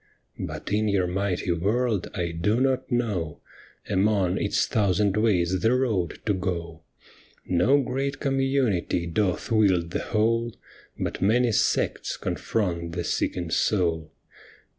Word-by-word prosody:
But - - -5
in 110 +1 +2
your 100 -3 +2
mighty 90 0 -1
world 105 +4 0
I 85 -3 -1
do 100 +8 0
not 130 0 0
know 105 -11 -1 0.5
Among 95 -2 +1
its 100 - +1
thousand 100 -3 +1
ways 95 -5 +2
the 115 +3 +3
road 110 -10 0
to 105 - +2
go; 85 -3 -4 0.6
No 110 +11 +3
great 135 +2 -2
community 135 -11 0
doth 90 +5 -1
wield 95 -6 +3
the - - -1
whole, 115 +1 +1 0.4
But - - -3
many 115 +4 +3
sects - - 0
confront 85 -6 -2
the - - -2
seeking 85 -2 -2
soul. 85 -7 +1
100 Hz, 125 wpm, -25 LUFS, 90-115 Hz, 0.6 s, the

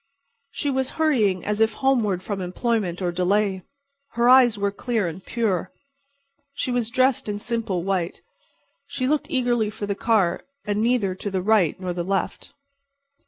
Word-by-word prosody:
She 285 - -2
was 265 -1 0
hurrying 225 - +2
as 210 +1 -1
if 220 0 +3
homeward 220 -9 +1
from 200 -1 -4
employment 185 -1 -1
or 175 - 0
delay. 190 +2 +1 0.5
Her 235 +1 +2
eyes 250 -3 +6
were 200 0 0
clear 220 -1 -1
and 170 +3 -7
pure, 200 -6 -1 0.8
she 260 - -2
was 245 -2 0
dressed 255 -2 +2
in 205 - -2
simple 215 -5 -2
white, 185 -2 -2 0.6
she 255 - -2
looked 300 +1 0
eagerly 240 -4 +1
for 215 0 -5
the 200 - -1
car 195 -4 +1 0.2
and 210 0 0
neither 230 -5 +1
to 190 +2 -5
the 190 -2 -2
right 205 -6 +3
nor 185 -1 -3
the 175 0 -3
left. 195 +1 -2
210 Hz, 165 wpm, -23 LUFS, 185-240 Hz, 0.8 s, eyes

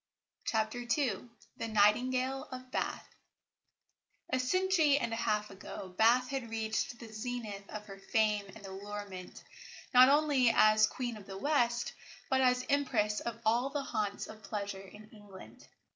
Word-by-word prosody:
CHAPTER 220 +1 0
II 240 -2 -1 0.3
THE - - -3
NIGHTINGALE 255 +5 +2
OF 255 0 -8
BATH - - -2 1.3
A 260 - +3
century 320 +1 +3
and 235 -5 -2
a - - 0
half 210 -2 0
ago 195 0 -8
Bath 230 +7 +3
had 265 -4 -3
reached 220 +1 -2
the 230 - -10
zenith 215 -3 -5
of 210 -1 -7
her 195 -1 -10
fame 210 -3 +2
and 200 - -11
allurement, 195 -1 -7 0.5
not 255 +1 +9
only 285 -4 +4
as 215 -1 +5
"Queen 240 -1 -4
of 200 - -13
the 195 - -7
West," 240 -2 +1 0.4
but 265 0 +4
as 250 0 +3
Empress 235 -7 +1
of 235 -1 -5
all 240 +4 +2
the 285 0 -3
haunts 215 -6 -2
of 215 0 -11
pleasure 200 -1 -4
in 210 +2 -13
England. 205 -3 -14
225 Hz, 150 wpm, -32 LUFS, 210-255 Hz, 1.3 s, not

